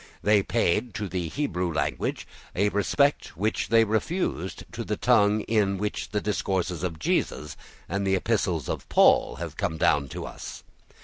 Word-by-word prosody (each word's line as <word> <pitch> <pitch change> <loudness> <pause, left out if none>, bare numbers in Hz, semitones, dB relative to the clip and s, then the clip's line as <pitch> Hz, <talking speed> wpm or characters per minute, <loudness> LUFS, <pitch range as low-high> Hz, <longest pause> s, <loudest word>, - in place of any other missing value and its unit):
They 105 0 +5
paid 115 +1 0
to 105 - -3
the 90 -2 -3
Hebrew 90 - -2
language 80 - -2 0.3
a 100 +3 +2
respect 105 - +1
which 110 +2 0
they 115 0 +6
refused 110 - -2
to - - -5
that - - -4
tongue 105 +1 +4
in 105 -3 +1
which 105 +2 -3
the 105 - 0
discourses 95 -5 -1
of 90 -3 -3
Jesus 75 -1 -1 0.3
and 100 +3 -1
the 95 - +3
epistles 95 - 0
of - - -4
Paul - - +5
have - - -6
come 80 - -1
down 75 -2 +2
to - - -6
us. - - -8
100 Hz, 165 wpm, -26 LUFS, 90-110 Hz, 0.3 s, they